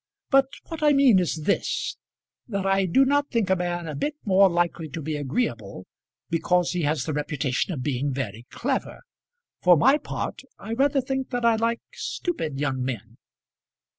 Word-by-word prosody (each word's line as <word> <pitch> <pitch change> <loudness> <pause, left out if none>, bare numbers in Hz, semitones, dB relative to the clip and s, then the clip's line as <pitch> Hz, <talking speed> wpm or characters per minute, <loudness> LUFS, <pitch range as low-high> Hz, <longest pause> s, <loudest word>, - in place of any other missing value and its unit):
But 270 -1 +5 0.2
what 325 -1 -6
I 295 -1 +5
mean 270 -8 +6
is 165 -3 -1
this, 200 - 0 0.5
that 200 -4 -3
I 195 0 +2
do 265 +11 +4
not 285 +1 +2
think 225 -6 0
a - - +5
man 175 -1 -3
a 155 - -4
bit 295 - -2
more 195 -1 +5
likely 170 -2 -1
to 155 - -6
be 155 0 -3
agreeable 125 - -3 0.4
because 175 +1 +1
he 180 0 -1
has 150 0 0
the 155 - -3
reputation 150 +1 -1
of 140 -7 -4
being 140 0 -1
very 120 -3 -5
clever. - - -3 0.6
For 180 -1 +6
my 270 - +5
part - - -5 0.2
I 225 - -6
rather 275 +3 +2
think 265 +1 -3
that 245 -2 -1
I 230 -1 +5
like 230 +1 0
stupid 160 - -3
young 135 -3 -1
men." 115 -3 -5
175 Hz, 175 wpm, -25 LUFS, 145-240 Hz, 0.6 s, mean